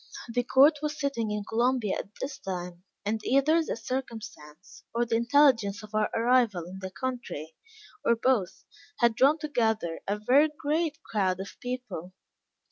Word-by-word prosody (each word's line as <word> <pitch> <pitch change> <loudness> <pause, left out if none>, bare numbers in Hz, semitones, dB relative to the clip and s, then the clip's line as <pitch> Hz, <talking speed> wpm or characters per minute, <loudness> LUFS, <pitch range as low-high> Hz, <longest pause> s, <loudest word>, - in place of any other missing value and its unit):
The 245 - +2
court 280 +5 +5
was 300 0 -3
sitting 255 -6 -1
in 210 0 -2
Columbia 235 -2 +1
at - - -6
this 270 0 -5
time, 180 -4 -5 0.2
and 215 +1 -1
either 300 +6 +3
this 230 -7 -5
circumstance 215 - -7
or 240 +1 +2
the 230 - 0
intelligence 235 -4 +3
of 215 - -12
our 215 -1 +1
arrival 230 -6 +2
in 185 +2 -9
the 190 0 -5
country, 240 - -5 0.5
or 235 - +4
both, 225 -6 0 0.3
had 235 -2 +3
drawn 275 +7 +4
together 220 - -1
a 205 +1 0
very 265 +9 +4
great 305 0 -1
crowd 190 -4 0
of 195 - -7
people. 245 -8 -6
230 Hz, 155 wpm, -28 LUFS, 200-265 Hz, 0.5 s, court